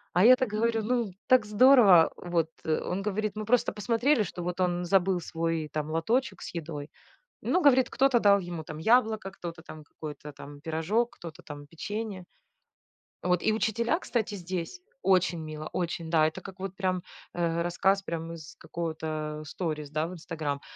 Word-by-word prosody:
А 180 Hz, -, +5 dB
я 255 Hz, +2 st, +9 dB
так 255 Hz, -2 st, -1 dB
говорю: 225 Hz, +1 st, 0 dB
"Ну, 235 Hz, -2 st, 0 dB, 0.2 s
так 255 Hz, -4 st, +5 dB
здорово, 210 Hz, -6 st, +7 dB
вот." 170 Hz, -2 st, -1 dB, 0.2 s
Он 175 Hz, +4 st, -1 dB
говорит: 210 Hz, +1 st, -2 dB
"Мы 215 Hz, 0 st, -4 dB
просто 240 Hz, +2 st, +2 dB
посмотрели, 230 Hz, +5 st, +2 dB
что 175 Hz, -2 st, -6 dB
вот 180 Hz, +1 st, -4 dB
он 175 Hz, -1 st, 0 dB
забыл 190 Hz, 0 st, +3 dB
свой 165 Hz, -2 st, -2 dB
там 155 Hz, 0 st, -2 dB
лоточек 230 Hz, +12 st, 0 dB
с -, -, -7 dB
едой." 155 Hz, -3 st, -5 dB, 0.5 s
Ну, 365 Hz, -, +2 dB
говорит: 260 Hz, -5 st, +5 dB
"Кто-то 265 Hz, -3 st, +3 dB
дал 200 Hz, -1 st, +6 dB
ему 175 Hz, -3 st, -5 dB
там 155 Hz, 0 st, -8 dB
яблоко, 220 Hz, +1 st, +2 dB
кто-то 170 Hz, -3 st, -7 dB
там 155 Hz, -2 st, -11 dB
какой-то 150 Hz, 0 st, -9 dB
там 145 Hz, 0 st, -11 dB
пирожок, 165 Hz, +10 st, -1 dB
кто-то 165 Hz, -2 st, -10 dB
там 145 Hz, -1 st, -9 dB
печенье." 200 Hz, +4 st, -5 dB, 1.0 s
Вот 180 Hz, -1 st, +1 dB
и 220 Hz, -, +3 dB
учителя, 230 Hz, -, 0 dB
кстати, 225 Hz, -, -2 dB
здесь 185 Hz, -, -5 dB, 0.2 s
Очень 180 Hz, -2 st, +3 dB
мило, 155 Hz, 0 st, -6 dB
очень. 170 Hz, -2 st, -3 dB
Да, 160 Hz, -2 st, +4 dB
это 155 Hz, -, -5 dB
как 190 Hz, -1 st, -11 dB
вот 195 Hz, 0 st, -5 dB
прям, 185 Hz, -2 st, -1 dB, 0.3 s
э, 170 Hz, -1 st, 0 dB
рассказ 190 Hz, +3 st, +2 dB
прям 165 Hz, -2 st, -4 dB
из 160 Hz, -3 st, -10 dB
какого-то 155 Hz, -2 st, -4 dB
сторис, 155 Hz, -2 st, -4 dB
да, 155 Hz, +1 st, 0 dB
в -, -, -8 dB
"Инстаграм". 155 Hz, -4 st, -4 dB
180 Hz, 170 wpm, -28 LUFS, 160-215 Hz, 1.0 s, я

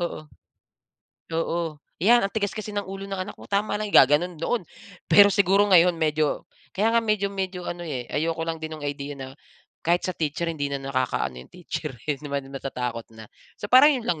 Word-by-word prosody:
Oo. 170 Hz, -3 st, -4 dB, 1.1 s
Oo. 165 Hz, -1 st, -2 dB, 0.2 s
"'Yan, 230 Hz, +4 st, +5 dB
ang 195 Hz, -, -2 dB
tigas 205 Hz, -1 st, -2 dB
kasi 215 Hz, 0 st, -5 dB
ng 205 Hz, -2 st, -3 dB
ulo 195 Hz, 0 st, -6 dB
ng 195 Hz, -1 st, -4 dB
anak 195 Hz, +2 st, -6 dB
mo, -, -, -12 dB
tama 205 Hz, +1 st, 0 dB
lang." 210 Hz, -1 st, -4 dB
Gagano'n 155 Hz, +5 st, +4 dB
noon. 225 Hz, +3 st, -1 dB, 0.4 s
Pero 200 Hz, 0 st, +8 dB
siguro 200 Hz, +1 st, +3 dB
ngayon 180 Hz, -1 st, +6 dB
medyo 155 Hz, -2 st, 0 dB, 0.3 s
kaya 210 Hz, +3 st, +2 dB
nga 230 Hz, -, +4 dB
medyo-medyo 195 Hz, -4 st, -2 dB
ano 175 Hz, 0 st, -5 dB
eh, 130 Hz, -6 st, -5 dB
ayoko 165 Hz, +2 st, -1 dB
lang 165 Hz, -, -1 dB
din 160 Hz, 0 st, -6 dB
no'ng 145 Hz, -2 st, -6 dB
idea 145 Hz, 0 st, -5 dB
na 135 Hz, -1 st, -8 dB, 0.6 s
kahit 175 Hz, +2 st, +2 dB
sa 185 Hz, -, -3 dB
teacher 160 Hz, +2 st, -2 dB
hindi 150 Hz, -3 st, -2 dB
na 140 Hz, -, -2 dB
nakakaano 130 Hz, -, -1 dB
'yong 60 Hz, -, -14 dB
teacher 160 Hz, -4 st, -5 dB, 0.2 s
eh, 145 Hz, -, +1 dB
'di 150 Hz, -, -9 dB
ba 140 Hz, -, 0 dB
natatakot 125 Hz, -4 st, -5 dB
na. 110 Hz, -1 st, -12 dB, 0.3 s
So, 205 Hz, -, -5 dB
parang 270 Hz, +4 st, +8 dB
'yon 240 Hz, -3 st, -4 dB
lang 160 Hz, -3 st, 0 dB
170 Hz, 200 wpm, -25 LUFS, 145-200 Hz, 1.1 s, Pero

